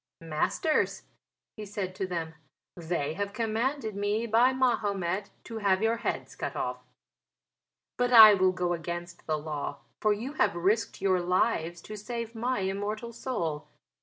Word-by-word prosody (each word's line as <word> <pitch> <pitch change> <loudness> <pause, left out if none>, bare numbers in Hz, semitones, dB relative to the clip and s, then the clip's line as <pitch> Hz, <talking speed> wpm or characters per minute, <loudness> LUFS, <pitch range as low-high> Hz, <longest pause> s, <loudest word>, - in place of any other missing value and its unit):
"Masters," 165 - 0 0.5
he 215 - -6
said 195 -2 -4
to 190 0 -3
them, 165 -3 -3 0.4
"they 160 -3 -2
have 200 +2 -3
commanded 225 +1 -1
me 205 +3 0
by 235 +3 +4
Mahomet 205 -7 0
to 225 -1 -6
have 195 -1 +2
your 225 +1 +2
heads - - -3
cut - - -4
off. - - -2 1.2
But 245 0 +1
I 220 -3 +11
will 185 -1 +3
go 180 -1 -1
against 170 +1 -6
the 155 -1 +1
law, 150 -2 -5 0.2
for 215 - +3
you 230 +7 -2
have 205 - +2
risked 195 +4 0
your 185 -2 +3
lives 175 -2 0
to 215 - -8
save 230 +2 -5
my 240 0 -1
immortal 205 +4 -3
soul. 165 - -3
200 Hz, 150 wpm, -29 LUFS, 175-225 Hz, 1.2 s, I